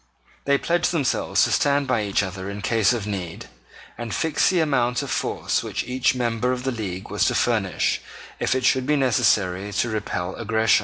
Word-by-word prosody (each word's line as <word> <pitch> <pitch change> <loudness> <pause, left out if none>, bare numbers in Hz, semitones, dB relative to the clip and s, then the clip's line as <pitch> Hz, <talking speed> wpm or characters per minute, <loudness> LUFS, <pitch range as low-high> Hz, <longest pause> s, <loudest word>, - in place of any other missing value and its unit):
They 140 0 +3
pledged 175 +4 +1
themselves 145 -7 +1
to - - +1
stand 140 0 +2
by 125 -4 +1
each 100 0 0
other 95 0 -5
in 100 0 -6
case 110 -1 +3
of 120 -5 -2
need, 95 -5 -5 0.5
and 120 -2 -4
fixed 160 -2 +2
the 185 - +2
amount 125 -5 +1
of 135 - -5
force - - -1
which - - -3
each 130 +1 +1
member 120 0 0
of 125 0 -3
the 135 - -1
league 95 -6 -5
was - - +1
to - - +1
furnish - - +1 0.4
if - - +1
it 130 -1 0
should 130 0 +2
be 150 - +3
necessary 105 -7 +2
to 120 - 0
repel 95 -4 -3
aggression. 110 0 +2
120 Hz, 195 wpm, -23 LUFS, 105-130 Hz, 0.5 s, They